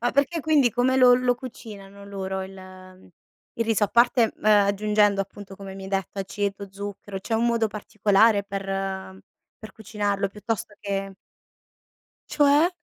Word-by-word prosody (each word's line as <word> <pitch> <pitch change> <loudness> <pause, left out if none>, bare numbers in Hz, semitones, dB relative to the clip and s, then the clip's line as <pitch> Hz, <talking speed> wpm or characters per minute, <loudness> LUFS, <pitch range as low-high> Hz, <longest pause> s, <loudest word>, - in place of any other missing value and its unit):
Ma 245 +1 +1
perché 285 +4 +1
quindi 285 -5 +3
come 250 +3 +1
lo 250 -1 +7
lo 250 0 +2
cucinano 205 -5 -11
loro 190 -1 -4
il, 195 +1 -9
uhm, 185 0 -14 0.5
il 230 - -1
riso? 225 -2 +2
A - - -2
parte, 235 -1 +3
uhm, - - -18
aggiungendo 205 0 +3
appunto 195 0 -8
come 195 -1 -9
mi 195 0 -9
hai - - -7
detto 195 0 -3
aceto, 200 +1 -3
zucchero, 200 0 -7
c'è 225 - -3
un 230 +2 +2
modo 230 -1 +2
particolare 210 0 +2
per 195 0 -5 1.0
per 215 - -9
cucinarlo 205 -2 -2
piuttosto 210 +1 -5
che 195 -1 -4 1.2
Cioè? 295 +3 +4
205 Hz, 155 wpm, -24 LUFS, 195-230 Hz, 1.2 s, lo